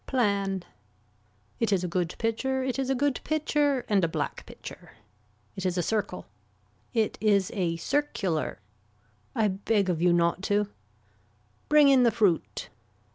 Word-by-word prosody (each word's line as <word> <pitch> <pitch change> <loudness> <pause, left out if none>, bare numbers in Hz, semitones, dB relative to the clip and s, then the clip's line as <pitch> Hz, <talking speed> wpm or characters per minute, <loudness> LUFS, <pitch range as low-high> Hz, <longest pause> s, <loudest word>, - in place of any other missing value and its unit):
Plan. 200 -7 0 1.0
It 230 -2 +1
is 190 -2 +2
a - - -1
good 175 -1 -1
pitcher 260 +4 -1
it 260 0 -2
is 265 -1 -1
a 270 - +2
good 280 +1 +1
pitcher 295 -4 +1
and 200 -3 +2
a - - +4
black 160 - -4
pitcher. - - -11 0.6
It 190 - -5
is 185 -1 0
a 175 - +1
circle. 210 -2 -2 0.7
It 225 -3 0
is 200 -3 +3
a 170 -4 -1
circular. 190 - -1 0.8
I 220 - +3
beg 195 0 +1
of 165 -2 -2
you 175 0 +4
not 170 +1 +2
to. 205 0 +2 1.0
Bring 300 -1 +7
in 270 -2 +6
the 240 - +5
fruit. 205 -8 0
210 Hz, 150 wpm, -27 LUFS, 180-260 Hz, 1.0 s, Bring